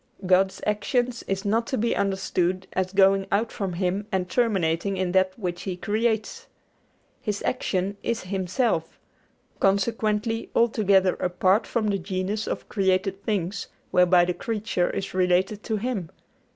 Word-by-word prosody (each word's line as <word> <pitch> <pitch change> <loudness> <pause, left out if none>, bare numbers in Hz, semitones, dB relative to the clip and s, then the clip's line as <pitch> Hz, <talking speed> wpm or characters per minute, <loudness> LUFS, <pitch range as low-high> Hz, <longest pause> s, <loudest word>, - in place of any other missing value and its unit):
God's 190 +1 +3
action 245 +4 +1 0.2
is 195 +1 -2
not 225 +3 +1
to 260 - -1
be 230 +2 +1
understood 190 -2 0
as 185 0 -1
going 195 0 +4
out 220 +3 +1
from 195 -3 -3
Him 190 +3 -1
and 185 -2 0
terminating 195 -4 +1
in 185 -1 0
that 185 0 +2
which 180 -5 -4
He 185 -2 -4
creates. 220 +2 -1 0.7
His 210 -2 -3
action 200 -5 -1
is 230 -1 -2
Himself; 185 -1 -1 0.6
consequently 215 +2 +1
altogether 200 -5 +3
apart 185 +4 +2
from 235 -3 -1
the 200 -1 0
genus 190 +3 -3
of - - -4
created 195 0 0
being 195 -4 0 0.4
whereby 180 -1 +5
the 180 - -1
creature 210 -2 -1
is 195 - -4
related 185 +3 +1
to 220 -2 -1
Him. 210 -7 -3
195 Hz, 140 wpm, -25 LUFS, 185-215 Hz, 0.7 s, whereby